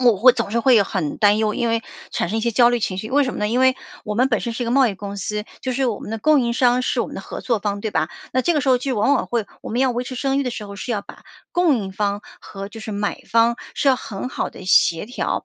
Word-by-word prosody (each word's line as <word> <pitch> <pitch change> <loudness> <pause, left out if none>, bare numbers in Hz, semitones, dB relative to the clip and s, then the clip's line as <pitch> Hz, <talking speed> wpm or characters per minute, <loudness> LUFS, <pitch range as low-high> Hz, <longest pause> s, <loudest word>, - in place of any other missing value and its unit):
我 240 -4 +5
会 250 +6 +7
总 230 -4 -3
是 230 - +1
会 235 -3 +5
很 185 -7 -3
担 205 0 +5
忧， 215 -1 +1
因 235 - 0
为 230 0 0 0.3
产 - - -1
生 220 - 0
一 - - -1
些 235 - 0
焦 240 +1 +5
虑 240 - 0
情 190 -3 -2
绪。 215 +4 -5
为 285 +2 +4
什 255 - -3
么 - - -5
呢？ 210 - 0
因 245 +3 +1
为 260 0 +4 0.3
我 210 -1 -3
们 255 +4 +3
本 225 - +2
身 235 - -3
是 245 - -3
一 - - -1
个 230 - -2
贸 265 -1 +4
易 205 - -3
公 200 +1 -7
司， 210 +2 -3 0.2
就 260 - -3
是 265 +2 0
我 225 -4 -2
们 - - -8
的 225 - -2
供 300 +4 +4
应 235 -1 0
商 250 0 +3
是 - - -1
我 - - -4
们 - - -9
的 - - -5
合 - - -7
作 235 -3 +1
方， 200 0 -2
对 215 0 -3
吧？ 160 -2 0 0.2
那 255 - +2
这 345 - +2
个 300 - +2
时 - - -1
候 250 - +5
就 260 -1 -2
往 270 +7 +3
往 275 - +1
会 230 -4 -1
我 - - -8
们 240 - 0
要 265 - +3
维 245 +1 -2
持 255 +1 -7
声 270 +2 0
誉 280 - +1
的 250 - -2
时 225 -2 -6
候， 200 0 -9
是 240 - -5
要 210 -3 -1
把 - - -13 0.3
供 345 -6 +3
应 195 -3 -4
方 205 +1 -1 0.2
和 195 -1 -8
就 225 - -9
是 220 - -6
买 205 0 -2
方， 230 +1 +4 0.2
是 - - -2
要 270 - +6
很 225 -2 -6
好 - - -2
地 - - -11
协 175 -1 +4
调， 245 +4 -3
230 Hz, 345 characters per minute, -21 LUFS, 205-255 Hz, 0.3 s, 会